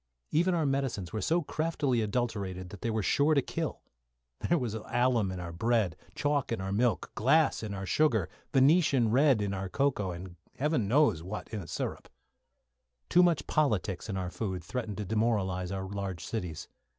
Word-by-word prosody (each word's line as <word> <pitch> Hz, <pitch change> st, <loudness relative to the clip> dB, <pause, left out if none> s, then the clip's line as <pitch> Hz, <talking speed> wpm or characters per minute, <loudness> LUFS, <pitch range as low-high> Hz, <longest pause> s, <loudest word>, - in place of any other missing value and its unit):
Even 175 Hz, +3 st, +3 dB
our 160 Hz, -3 st, +1 dB
medicines 135 Hz, -10 st, -1 dB
were 110 Hz, -, -2 dB
so 170 Hz, -, +1 dB
craftily 150 Hz, -6 st, 0 dB
adulterated 100 Hz, -5 st, -2 dB
that 100 Hz, -, -10 dB
they 115 Hz, -, -1 dB
were 110 Hz, -2 st, 0 dB
sure 145 Hz, +9 st, +3 dB
to 140 Hz, -, +4 dB
kill. -, -, -3 dB, 0.6 s
There 175 Hz, -, +2 dB
was 125 Hz, -7 st, -2 dB
alum 115 Hz, -2 st, +1 dB
in 95 Hz, -, -5 dB
our 85 Hz, -1 st, -5 dB
bread, 110 Hz, -2 st, +1 dB, 0.2 s
chalk 145 Hz, -3 st, 0 dB
in 115 Hz, -, -1 dB
our 95 Hz, 0 st, -3 dB
milk, 115 Hz, +3 st, +1 dB
glass 150 Hz, +8 st, +3 dB
in 105 Hz, -2 st, -4 dB
our 95 Hz, 0 st, -4 dB
sugar, 110 Hz, -, +2 dB, 0.2 s
Venetian 135 Hz, -4 st, +4 dB
red 130 Hz, -3 st, +4 dB
in 100 Hz, -1 st, -2 dB
our 95 Hz, -1 st, -3 dB
cocoa, 130 Hz, -6 st, 0 dB
and 90 Hz, 0 st, -7 dB, 0.2 s
heaven 150 Hz, -6 st, 0 dB
knows 135 Hz, -, +3 dB
what 95 Hz, +5 st, -6 dB
in 110 Hz, -3 st, -4 dB
the 85 Hz, -, -10 dB
syrup. -, -, -4 dB, 1.0 s
Too 175 Hz, -, +6 dB
much 175 Hz, -5 st, +3 dB
politics 110 Hz, -, 0 dB
in 95 Hz, -, -2 dB
our 90 Hz, -1 st, -3 dB
food 95 Hz, -5 st, -3 dB
threatened 110 Hz, +1 st, -4 dB
to 105 Hz, -, -3 dB
demoralise 95 Hz, -4 st, 0 dB
our 95 Hz, -1 st, -3 dB
large 95 Hz, -3 st, -4 dB
cities. 90 Hz, -9 st, -4 dB
110 Hz, 180 wpm, -30 LUFS, 95-140 Hz, 1.0 s, Too